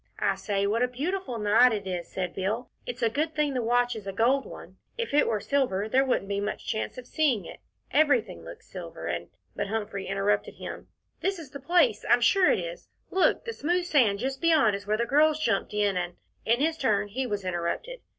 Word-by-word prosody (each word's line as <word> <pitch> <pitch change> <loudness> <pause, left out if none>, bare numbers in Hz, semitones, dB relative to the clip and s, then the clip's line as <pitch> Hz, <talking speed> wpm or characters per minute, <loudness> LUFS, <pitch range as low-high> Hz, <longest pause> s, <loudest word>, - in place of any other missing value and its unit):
"I 195 - +1
say, 195 +1 -1
what 215 +4 +1
a 250 - +4
beautiful 285 +2 -3
night 225 +4 +5
it 205 -3 -3
is," 180 -2 -4
said 185 -2 -4
Bill. 215 +6 -3 0.2
"It's 245 0 -4
a 230 - +4
good 310 +5 -1
thing 300 -2 +1
the 255 - 0
watch 245 +1 +2
is 210 -3 -8
a - - -2
gold 245 +7 +2
one; - - -11 0.2
if 465 -7 -3
it 295 - +4
were 215 -2 0
silver 220 -7 0
there 260 +4 +3
wouldn't 250 -7 0
be 200 0 -1
much 205 +1 -4
chance 220 +2 -3
of 250 - -8
seeing 255 - +1
it - - -10 0.3
everything 280 -6 +2
looks 455 -2 -11
silver, - - -8
and - - -3
" - - -43
But - - -2
Humphrey 205 -2 -3
interrupted 195 +1 0
him. - - -8 0.3
"This 390 0 -1
is 310 -6 -10
the 280 - -7
place 295 -6 +2
I'm 240 - +5
sure 365 +10 +5
it - - +2
is - - -6 0.2
look, 375 -1 +2
the 460 - -4
smooth 350 0 0
sand 245 - +3
just 265 +4 -3
beyond 310 -11 +4
is 200 0 -8
where 215 +1 +1
the 235 - 0
girls 305 +4 +3
jumped 235 -7 0
in, 205 -2 +1
and 175 -1 -2 0.2
" - - -40
In 235 +3 +3
his 320 +2 +1
turn 210 -5 +1
he 255 +5 -2
was 205 -3 -3
interrupted. 185 - -3
240 Hz, 230 wpm, -27 LUFS, 205-295 Hz, 0.3 s, night